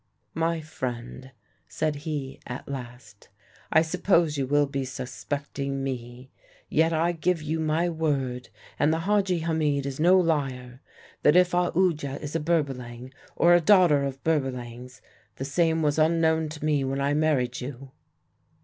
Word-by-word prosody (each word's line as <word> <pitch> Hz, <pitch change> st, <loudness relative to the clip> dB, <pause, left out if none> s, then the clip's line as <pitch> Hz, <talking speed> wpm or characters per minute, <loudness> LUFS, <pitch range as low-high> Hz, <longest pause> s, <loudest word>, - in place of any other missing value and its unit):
"'My 165 Hz, 0 st, 0 dB
friend,' 130 Hz, -3 st, -6 dB, 0.4 s
said 155 Hz, -1 st, -1 dB
he 145 Hz, -3 st, -5 dB
at 125 Hz, 0 st, -7 dB
last, 120 Hz, -6 st, -9 dB, 0.4 s
'I 160 Hz, -, +5 dB
suppose 170 Hz, -2 st, +2 dB
you 135 Hz, -2 st, -1 dB
will 145 Hz, +1 st, +3 dB
be 140 Hz, -1 st, -3 dB
suspecting 135 Hz, +1 st, -4 dB
me; 125 Hz, -1 st, -6 dB, 0.4 s
yet 160 Hz, +1 st, +3 dB
I 165 Hz, +2 st, +1 dB
give 175 Hz, +1 st, 0 dB
you 160 Hz, +2 st, -2 dB
my 160 Hz, +2 st, +1 dB
word 140 Hz, -7 st, -2 dB, 0.3 s
and 150 Hz, -, +3 dB
the 160 Hz, +1 st, 0 dB
Hadji 195 Hz, -2 st, +1 dB
Hamid 155 Hz, -4 st, 0 dB
is 140 Hz, 0 st, -5 dB
no 180 Hz, +4 st, +5 dB
liar 135 Hz, -7 st, -1 dB, 0.4 s
that 150 Hz, -, +4 dB
if 180 Hz, 0 st, +5 dB
Aoodya 175 Hz, -5 st, +1 dB
is 150 Hz, +1 st, -7 dB
a -, -, +2 dB
Berbalang, 130 Hz, -6 st, -2 dB, 0.2 s
or 175 Hz, +1 st, +5 dB
a 175 Hz, -, +5 dB
daughter 175 Hz, -6 st, +5 dB
of 135 Hz, -1 st, -5 dB
Berbalangs, 125 Hz, -4 st, -3 dB, 0.3 s
the 135 Hz, -, -5 dB
same 160 Hz, +2 st, +1 dB
was 150 Hz, +1 st, +1 dB
unknown 160 Hz, 0 st, +2 dB
to 150 Hz, 0 st, -6 dB
me 150 Hz, -3 st, +2 dB
when 135 Hz, +1 st, -2 dB
I 140 Hz, +1 st, +1 dB
married 145 Hz, -5 st, +1 dB
you.' 130 Hz, +1 st, -8 dB
145 Hz, 150 wpm, -26 LUFS, 130-160 Hz, 0.4 s, I